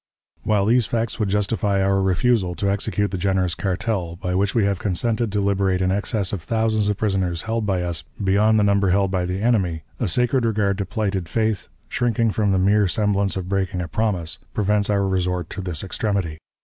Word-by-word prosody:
"While 105 -2 +1
these 115 +1 +3
facts 115 -1 -2
would 105 -3 0
justify 105 0 0
our 95 0 +2
refusal 95 0 +1
to 100 +2 0
execute 105 0 -1
the 95 - -3
generous 95 -2 +1
cartel, 95 -3 -2
by 90 0 -3
which 95 +1 0
we 110 -4 +3
have 100 -2 0
consented 110 +3 0
to 100 0 0
liberate 100 -2 +1
an 95 0 +1
excess 100 0 -1
of 95 - -3
thousands 110 0 0
of 105 - -1
prisoners 95 -5 -1
held 115 -1 -2
by 95 -3 0
us 85 -3 -3 0.2
beyond 105 +3 +3
the - - +3
number 100 -1 +3
held 95 +1 +2
by 90 -2 0
the 95 +3 -3
enemy, 95 -9 +1 0.2
a - - 0
sacred 125 +7 +2
regard 105 -3 +1
to 100 - -2
plighted 95 -4 -2
faith, 110 -3 0 0.2
shrinking 115 -2 +1
from 105 -1 +1
the 95 - +2
mere 100 +2 +3
semblance 100 0 0
of 90 -1 -4
breaking 95 -1 -1
a 90 - -3
promise, 90 -3 -2 0.2
prevents 105 0 +1
our 100 -1 +2
resort 90 -2 -1
to 95 - -5
this 90 -5 -3
extremity. 95 -5 -2
100 Hz, 200 wpm, -22 LUFS, 95-105 Hz, 0.2 s, these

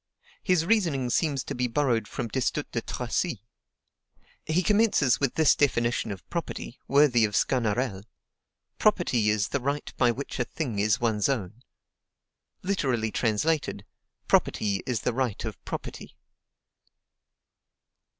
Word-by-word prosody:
His 180 -5 +2
reasoning 165 - +1
seems 145 -4 +1
to - - -5
be 125 0 -1
borrowed 120 -3 0
from 120 - -4
Destutt 130 +3 -2
de - - -2
Tracy. - - -2 1.0
He 165 +4 +1
commences 205 - +3
with 140 -3 0
this 160 -2 +5
definition 120 -5 +1
of 95 -2 -8
property, 170 -7 -5
worthy 140 -4 +4
of 105 -1 0
Sganarelle: 115 -4 0 0.8
"Property 110 -3 +2
is 105 0 +1
the 140 - -1
right 140 +3 -3
by 125 - +4
which 130 +3 -4
a - - +3
thing 120 -4 -4
is 105 0 +2
one's 110 -1 +1
own." 115 -3 -3 1.0
Literally 130 - 0
translated: 130 +9 0 0.4
Property 100 -2 +1
is 120 -4 -1
the 125 - -1
right 125 -4 -2
of - - -7
property. - - -7
125 Hz, 130 wpm, -27 LUFS, 110-145 Hz, 1.0 s, this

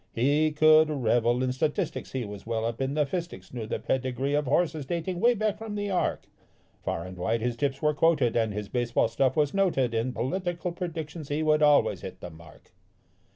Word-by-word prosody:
He 145 +6 +2
could 155 +1 +5
revel 120 -3 +1
in 130 - 0
statistics, 150 +7 -2
he 130 -3 -2
was 100 -1 -8
well 115 -1 -1
up 115 +2 -3
in 135 +2 -1
the 150 -1 +2
fistics, 140 - -6
knew 115 -3 -5
the - - -2
pedigree 130 +1 -1
of 150 0 +1
horses 155 +1 0
dating 175 +2 -3
'way 240 +4 +4
back 215 -1 -1
from 220 -2 -6
the 205 -1 -2
ark. 180 - -1 0.5
Far 85 - -3
and 90 0 -8
wide 110 +6 -1
his 120 0 -1
tips 135 +2 -2
were 150 0 +3
quoted, 150 -6 +2
and 115 -2 +1
his 105 0 -4
base 120 +1 -2
ball 115 - +3
stuff 130 +2 +1
was 145 -2 +2
noted. 170 -12 +1
In 115 +3 0
political 175 +7 -2
predictions 165 -3 -6
he 150 +2 -1
would 155 0 +3
always 150 -1 +4
hit - - -8
the 90 - -8
mark. 80 0 -16
140 Hz, 205 wpm, -27 LUFS, 120-160 Hz, 0.5 s, could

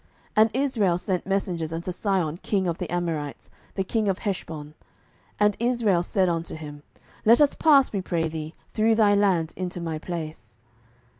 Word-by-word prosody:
07:011:019 - - -34 0.3
And 220 +1 +6
Israel 230 -10 +2
sent 180 0 -2
messengers 180 -5 -1
unto 170 +3 -3
Sihon 180 -4 -1
king 190 0 -1
of 170 -1 -2
the 180 - -4
Amorites, 165 -5 -3 0.2
the 195 - 0
king 215 +1 0
of 190 - 0
Heshbon; 160 -8 -5 0.7
and 210 0 +3
Israel 235 -7 +2
said 185 +1 +1
unto 165 -2 -2
him, 145 -2 -9 0.4
Let 230 +2 +6
us 295 -2 +5
pass, 280 -6 +4
we 200 - -1
pray 170 -3 -1
thee, 155 0 -6 0.2
through 225 +1 +3
thy 210 -2 +4
land 190 -6 +2
into 180 -1 -4
my 165 -2 -3
place. 160 -2 -7
180 Hz, 170 wpm, -25 LUFS, 165-210 Hz, 0.7 s, And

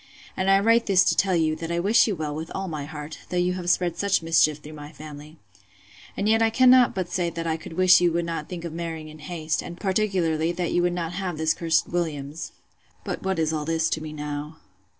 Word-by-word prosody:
And 190 +1 0
I 195 0 +6
write 230 +3 +3
this 195 -2 +5
to - - +2
tell 190 -2 +2
you, 160 -2 +1
that 165 +1 -5
I 170 - 0
wish 205 +7 +4
you 210 - -1
well 150 -2 -4
with 160 +2 -6
all 190 0 -3
my 155 -4 -4
heart, 150 0 -8
though 180 - -2
you 180 +1 +1
have 180 -1 -4
spread 175 -1 +1
such 200 -4 +1
mischief 160 -2 +3
through 150 +1 -12
my 150 0 -9
family.—And 145 - -10
yet 225 +1 +3
I 225 - +4
cannot 255 +1 +5
but 185 -2 -2
say 175 -2 0
that 165 0 -5
I 160 -1 0
could 160 - -9
wish 185 +1 +6
you 175 -1 +3
would 170 0 0
not 165 -2 -4
think 175 -2 -6
of 165 - -5
marrying 165 -2 -5
in 155 0 -12
haste; 155 0 -3
and, 175 0 -9
particularly, 185 -5 0
that 175 -1 -2
you 175 - +2
would 175 0 +1
not 170 -1 -3
have 180 -3 -3
this 160 0 +2
cursed 165 -2 +1
Williams.—But 155 -3 -6
what 190 -1 -1
is 160 -1 0
all 155 -1 -2
this 160 +1 0
to 155 - -1
me 155 -1 -6
now? 150 +1 -6
165 Hz, 235 wpm, -25 LUFS, 155-185 Hz, -, I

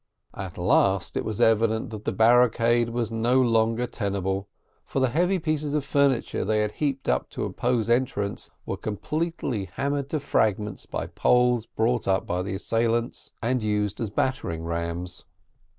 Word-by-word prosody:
At 95 -3 -7
last, 95 +1 +2
it - - 0
was 110 -2 -4
evident 110 0 +2
that 110 -1 -8
the - - 0
barricade 120 0 +4
was 115 -1 -2
no 120 +3 +2
longer 115 -1 +2
tenable, 100 -3 -2 0.4
for - - -3
the 130 -1 +3
heavy 180 +8 +2
pieces 155 -3 -1
of 145 -2 0
furniture 140 -3 +1
they 105 +2 +1
had 105 0 0
heaped 140 +1 -2
up 60 0 +1
to - - -3
oppose 120 -3 0
entrance 120 -5 0 0.2
were - - -3
completely 130 - -3
hammered 140 0 -1
to 155 - -1
fragments 105 -7 0
by - - -3
poles 125 -2 +2
brought 115 +1 0
up 95 -1 +2
by 90 +1 -1
the 95 +1 -3
assailants, 115 +3 -1
and 125 +1 +1
used 105 -1 -1
as 115 - -1
battering 100 -8 -1
rams. 85 +1 -4
115 Hz, 160 wpm, -25 LUFS, 100-125 Hz, 0.4 s, barricade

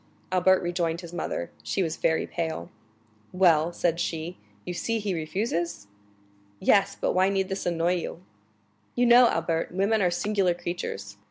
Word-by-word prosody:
Albert 185 0 +4
rejoined 175 -1 -1
his 170 -1 -10
mother; 85 - -3
she 195 - -1
was 160 -2 -2
very 160 - +1
pale. 160 - -4 0.6
"Well," 170 -3 +4
said 170 -1 0
she, 165 +1 -3 0.3
"you 180 - -4
see 230 +6 -1
he 205 -3 -2
refuses?" 170 - -2 0.7
"Yes; 200 0 +3
but - - +1
why 185 +1 +3
need 195 -1 0
this 195 -1 -3
annoy 175 +1 +1
you?" 170 +1 -6 0.7
"You 245 - +3
know, 240 +1 +8
Albert, 165 0 -1
women 200 +4 +1
are 180 - +3
singular 185 0 +1
creatures. 170 - -5
175 Hz, 155 wpm, -26 LUFS, 165-190 Hz, 0.7 s, know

